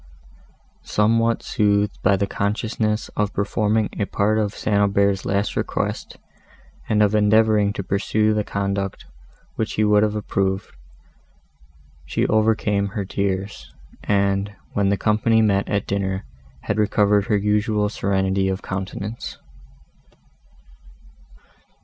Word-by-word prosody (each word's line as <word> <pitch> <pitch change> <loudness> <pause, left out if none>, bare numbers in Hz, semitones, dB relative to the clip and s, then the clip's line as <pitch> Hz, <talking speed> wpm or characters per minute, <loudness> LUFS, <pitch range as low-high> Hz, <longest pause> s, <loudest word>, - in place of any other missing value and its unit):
Somewhat 115 +2 +1
soothed 105 -1 +1
by 100 +1 +3
the 100 +1 0
consciousness 105 +2 -2
of 105 -1 -2
performing 105 +1 +1
a 105 - +1
part 105 +2 +1
of 105 -1 -1
St. 105 - -1
Aubert's 100 -1 +2
last 100 +2 -1
request, - - -3 0.7
and 105 0 +3
of 105 0 +2
endeavouring 105 -1 +3
to 100 - -4
pursue 105 +3 +1
the 105 0 0
conduct 100 -1 -3 0.5
which 110 - -2
he 110 - +1
would 105 0 +4
have 105 0 +1
approved, 95 -2 -2 1.4
she - - 0
overcame 105 -2 +1
her 100 0 -4
tears, 100 +1 -3 0.3
and, 100 0 +1 0.2
when 100 -1 +1
the 100 - +1
company 110 +2 +2
met 100 -3 +2
at 100 -1 0
dinner, 95 0 -2 0.4
had 105 +9 -2
recovered 105 -1 +3
her 105 - +2
usual 105 +1 +1
serenity 95 -1 0
of 95 0 -3
countenance. 100 +3 -5
100 Hz, 120 wpm, -22 LUFS, 100-105 Hz, 1.4 s, would